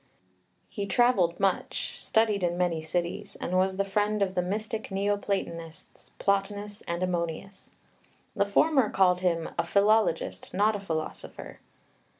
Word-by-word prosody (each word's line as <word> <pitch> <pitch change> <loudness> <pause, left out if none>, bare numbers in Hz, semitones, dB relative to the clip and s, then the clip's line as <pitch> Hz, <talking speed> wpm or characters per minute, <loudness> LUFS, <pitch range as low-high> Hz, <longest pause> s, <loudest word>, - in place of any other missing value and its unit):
He 200 -1 -4
travelled 195 -5 +3
much, 195 -1 -1
studied 220 -3 +2
in 175 -1 0
many 175 -3 0
cities, 175 +5 -3
and 180 - -2
was 190 +1 +2
the 200 - +1
friend 205 +1 +1
of 190 -1 -2
the 180 - +1
mystic 215 +4 -3
Neoplatonists, 195 -5 -3
Plotinus 205 +1 -1
and 170 +1 -2
Ammonius. 180 +2 -3 0.7
The 200 - +2
former 265 +3 +3
called 180 -2 +3
him 170 -3 0
"a - - +3
philologist, 200 - +2
not 210 +3 +3
a - - -3
philosopher." 160 -5 -6
195 Hz, 135 wpm, -28 LUFS, 175-205 Hz, 0.7 s, travelled